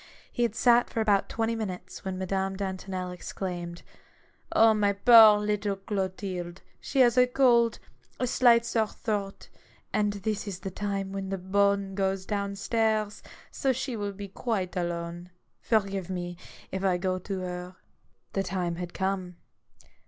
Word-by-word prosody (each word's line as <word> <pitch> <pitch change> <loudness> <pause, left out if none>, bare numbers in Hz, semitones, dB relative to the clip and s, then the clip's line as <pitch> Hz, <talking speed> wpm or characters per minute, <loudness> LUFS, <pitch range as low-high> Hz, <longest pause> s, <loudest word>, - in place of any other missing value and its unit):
He - - -3
had 235 -2 +1
sat 240 0 +4
for - - -3
about 205 -3 +2
twenty 230 0 -1
minutes, 190 -4 -6
when 190 -1 -4
Madame 190 +1 -1
Dantonel 190 -1 -4
exclaimed: 175 -1 -6 0.4
— - - -16
"My 215 -2 +5
poor 220 0 +8
little 210 -1 -1
Clotilde! 190 -2 -4 0.2
She 275 - +1
has 240 0 +5
a 250 - +6
cold, 240 -3 +3 0.4
a 255 - +1
slight 235 -1 +4
sore 225 -2 +1
throat, 205 -3 -4 0.4
and 210 -1 +1
this 205 +1 -3
is 190 -2 -5
the 190 0 -5
time 195 0 -3
when 195 -1 -4
the 195 - -2
bonne 200 +1 +1
goes 190 -1 -1
down 200 -1 -2
stairs, 215 -1 0 0.3
so 270 - +1
she 260 -1 -3
will 205 -2 -3
be 200 +1 -7
quite 195 -2 -3
alone. 175 0 -3 0.3
Forgive 195 -4 0
me 175 -1 -4 0.4
if 190 0 -3
I 185 -2 +2
go 185 0 -1
to 190 0 -4
her." 180 0 -6 0.6
The 195 - +1
time 180 -2 -2
had 175 -1 -6
come. 190 -2 -2
195 Hz, 155 wpm, -28 LUFS, 185-215 Hz, 0.6 s, poor